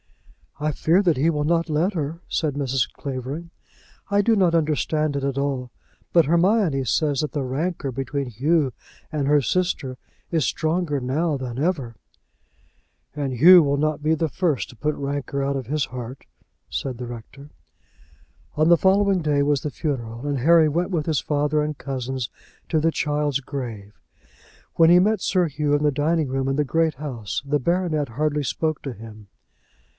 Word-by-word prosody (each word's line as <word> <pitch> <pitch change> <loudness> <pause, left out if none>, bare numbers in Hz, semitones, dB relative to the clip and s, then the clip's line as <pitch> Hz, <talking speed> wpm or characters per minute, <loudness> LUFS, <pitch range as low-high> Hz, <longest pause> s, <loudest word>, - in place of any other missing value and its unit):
"I 155 +1 0
fear 165 +6 +2
that 170 -6 +2
he 150 +5 +3
will 150 -2 0
not 165 +2 +1
let 160 +7 +1
her," 160 0 -3
said 155 -3 -1
Mrs. 135 -5 0
Clavering. 140 +5 -6 0.6
"I 200 0 +4
do 225 +2 +3
not 185 -5 +3
understand 155 -1 +1
it 140 -1 -2
all, 135 -3 -2 0.4
but 170 -2 +5
Hermione 170 -2 +2
says 145 0 +1
that 150 - -3
the 145 - -2
rancour 140 +2 -2
between 135 +2 -3
Hugh 135 +4 +1 0.4
and 145 -3 -1
her 145 0 +4
sister 140 -5 -1 0.3
is 165 -3 +2
stronger 160 -2 0
now 145 +5 0
than 125 -2 -6
ever." 140 -8 -1 1.2
"And 140 -3 -2
Hugh 175 +8 +8
will 140 0 +1
not 150 0 -1
be 155 +1 +3
the 160 0 0
first 160 -5 -1
to - - -13
put 150 +5 -1
rancour 140 0 -3
out 140 0 -1
of 135 -2 -3
his 150 +1 0
heart," 125 +1 -8 0.4
said 130 -3 -3
the 125 - -5
rector. 130 +5 -10 1.0
On 155 +2 +3
the 170 - +7
following 195 +1 +3
day 150 -2 +1
was 145 -1 +1
the 150 - -4
funeral 120 -4 -4
and 140 -2 -1
Harry 160 +3 +5
went 175 +6 -1
with 160 -4 -1
his 155 -4 +1
father 150 +1 0
and 150 -1 -3
cousins 130 -3 -4 0.4
to 160 - +2
the 165 +2 +2
child's 145 -3 0
grave. 120 -7 -6 0.8
When 165 -1 +6
he 175 - +7
met 215 +4 +2
Sir 180 -2 +2
Hugh 150 0 -1
in 145 - 0
the 150 - +3
dining 150 +2 +1
room 135 0 -2
in 135 - 0
the 150 - +2
Great 160 +2 +1
House 120 -7 -4
the 145 +1 +1
baronet 160 -2 0
hardly 150 +4 -1
spoke 155 +3 -2
to 135 - -4
him. 110 -1 -12
150 Hz, 175 wpm, -23 LUFS, 135-165 Hz, 1.2 s, Hugh